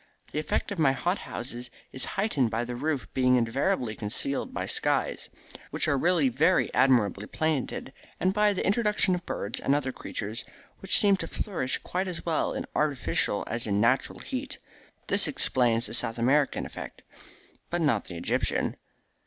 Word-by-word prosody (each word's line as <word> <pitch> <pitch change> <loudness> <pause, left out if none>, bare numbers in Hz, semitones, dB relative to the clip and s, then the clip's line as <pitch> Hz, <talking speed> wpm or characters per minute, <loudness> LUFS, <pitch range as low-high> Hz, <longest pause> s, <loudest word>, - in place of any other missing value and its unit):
The 150 - -1
effect 155 +5 -1
of 200 - -4
my 135 -4 +4
hot 175 +9 -1
houses 120 0 -6 0.2
is 130 - -3
heightened 150 - +2
by 115 +2 -1
the 120 0 -5
roofs 145 +1 -1
being 125 -1 +4
invariably 125 - +1
concealed 115 +6 -1
by - - -3
skies, - - 0 0.4
which - - +1
are 150 - +3
really 165 +1 +3
very 150 +9 +2
admirably 115 -6 +3
painted, 150 -3 -2 0.3
and 185 +1 +2
by 210 0 +3
the 185 - -2
introduction 210 -2 +3
of 180 -1 -2
birds 100 - -3
and 140 - +2
other 135 -2 -1
creatures, 110 -1 -5 0.4
which 195 - +3
seem 200 -2 +4
to 165 - -5
flourish 165 -11 -2
quite 185 +2 -3
as 180 -2 -5
well 165 -2 +1
in - - -3
artificial 140 -8 +1
as 115 +1 -2
in 100 -1 +1
natural 120 +4 +2
heat. - - -5 0.5
This - - +3
explains 120 -2 +1
the - - -4
South 115 0 +1
American 135 +5 +2
effect." - - -8 0.7
"But 175 0 -1
not 140 -10 +2
the 90 - -7
Egyptian." 85 - 0
135 Hz, 170 wpm, -28 LUFS, 120-175 Hz, 0.7 s, my